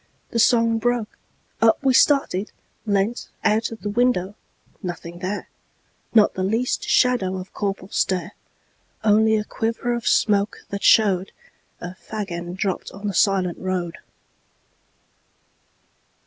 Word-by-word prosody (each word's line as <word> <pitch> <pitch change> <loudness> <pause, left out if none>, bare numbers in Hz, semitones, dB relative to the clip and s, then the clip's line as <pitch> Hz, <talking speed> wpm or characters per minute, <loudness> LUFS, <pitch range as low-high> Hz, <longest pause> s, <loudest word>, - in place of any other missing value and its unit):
The 230 - -1
song 230 -1 +4
broke, 240 -1 -1 0.5
up 225 -1 +5
we 265 -1 +3
started, 250 -8 +3 0.4
leantOut 215 +2 0
of 225 - -9
the 205 - -3
window—nothing 185 -6 -3
there, 195 +3 -4 0.7
Not 215 -2 +6
the 185 - -4
least 225 +6 -1
shadow 240 -7 +3
of 185 +1 -9
Corporal 195 -2 -3
Stare, 185 0 0 0.7
Only 220 +1 +4
a 210 - -1
quiver 230 +3 -2
of 235 -1 -3
smoke 205 -1 +2
that 200 0 -4
showedA 195 -4 +4 0.5
fag 190 +3 -6
end 175 +1 -5
dropped 195 -1 -2
on 200 +2 -10
the 200 - -1
silent 190 -2 +2
road. 185 -1 -3
205 Hz, 120 wpm, -22 LUFS, 185-225 Hz, 0.7 s, Not